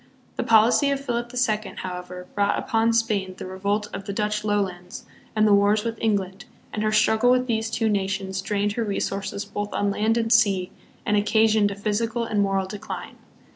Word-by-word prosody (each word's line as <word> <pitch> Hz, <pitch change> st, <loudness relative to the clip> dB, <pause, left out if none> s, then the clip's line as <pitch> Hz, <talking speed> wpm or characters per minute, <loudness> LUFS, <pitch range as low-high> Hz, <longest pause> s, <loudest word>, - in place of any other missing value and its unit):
The -, -, -1 dB
policy 230 Hz, +5 st, +4 dB
of 280 Hz, -1 st, 0 dB
Philip 240 Hz, -3 st, -3 dB
the 250 Hz, -, -8 dB
Second, 215 Hz, -4 st, -1 dB
however, 180 Hz, 0 st, -7 dB
brought 200 Hz, 0 st, +1 dB
upon 225 Hz, -2 st, +1 dB
Spain 215 Hz, -5 st, 0 dB
the -, -, -7 dB
revolt 200 Hz, +3 st, -2 dB
of 195 Hz, -, -6 dB
the 200 Hz, -, -4 dB
Dutch 210 Hz, 0 st, -1 dB
Lowlands 190 Hz, -4 st, -2 dB, 0.3 s
and 215 Hz, 0 st, +4 dB
the 205 Hz, -, +5 dB
wars 205 Hz, +1 st, +3 dB
with 230 Hz, -1 st, -4 dB
England, 195 Hz, -4 st, -1 dB, 0.3 s
and 210 Hz, -, -2 dB
her 215 Hz, 0 st, +1 dB
struggle 220 Hz, +2 st, +3 dB
with 250 Hz, 0 st, +3 dB
these 225 Hz, -2 st, -1 dB
two 225 Hz, 0 st, 0 dB
nations 195 Hz, -2 st, -1 dB
drained 205 Hz, +1 st, -1 dB
her 230 Hz, +3 st, -2 dB
resources 200 Hz, -1 st, -3 dB
both 205 Hz, 0 st, -5 dB
on 205 Hz, 0 st, +1 dB
land 220 Hz, +3 st, +1 dB
and 225 Hz, 0 st, +2 dB
sea, 195 Hz, -5 st, +3 dB, 0.3 s
and 210 Hz, -, +2 dB
occa 215 Hz, +2 st, +3 dB
sioned 215 Hz, -2 st, +3 dB
a 200 Hz, -, -5 dB
physical 225 Hz, +3 st, -1 dB
and 215 Hz, -3 st, 0 dB
moral 195 Hz, -1 st, +1 dB
decline. 205 Hz, +2 st, -7 dB
210 Hz, 195 wpm, -24 LUFS, 200-225 Hz, 0.3 s, the